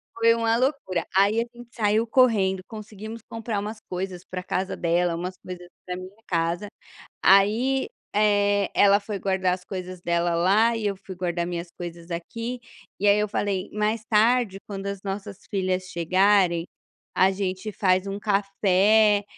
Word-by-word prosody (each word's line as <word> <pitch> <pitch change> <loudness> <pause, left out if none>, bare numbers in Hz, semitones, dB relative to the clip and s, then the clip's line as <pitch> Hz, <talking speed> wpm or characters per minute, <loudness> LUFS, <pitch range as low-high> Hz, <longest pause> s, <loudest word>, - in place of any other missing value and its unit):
Foi 230 0 +4
uma 230 0 +1
loucura, 255 - -1
aí 200 +3 +4
a - - -2
gente 240 0 -12
saiu 220 0 +1
correndo, 210 -7 +3
conseguimos 220 +1 -9
comprar 225 -2 -3
umas 210 +2 -5
coisas 180 -1 -4
pra 185 0 -5
casa 190 +1 -2
dela, 175 0 +1
umas 180 +2 -4
coisas 180 -1 -8 0.2
pra 180 - -4
minha 185 +4 -11
casa, 170 +3 -1 0.6
aí, 225 - +4 0.3
eh, 205 -1 +2
ela 200 0 +6
foi 200 0 -5
guardar 190 -2 +1
as 180 0 -10
coisas 185 -1 -6
dela 170 0 +1
lá, 205 +7 +3
e 220 -2 -2
eu 200 -1 -1
fui 190 0 -10
guardar 175 -1 -2
minhas 175 0 -4
coisas 170 0 -9
aqui, 230 +8 -5 0.4
e 205 - +1
aí 200 +1 +5
eu 210 0 0
falei: 200 -2 -2
"Mais 215 +1 -1
tarde 220 -2 +2
quando 195 -1 -5
as 200 -1 -4
nossas 195 0 -5
filhas 185 -2 -1
chegarem, 185 0 +2 0.5
a 190 +1 +4
gente 190 +1 -3
faz 185 -2 +2
um 195 0 -4
café 205 +1 +3
195 Hz, 160 wpm, -25 LUFS, 185-215 Hz, 0.6 s, ela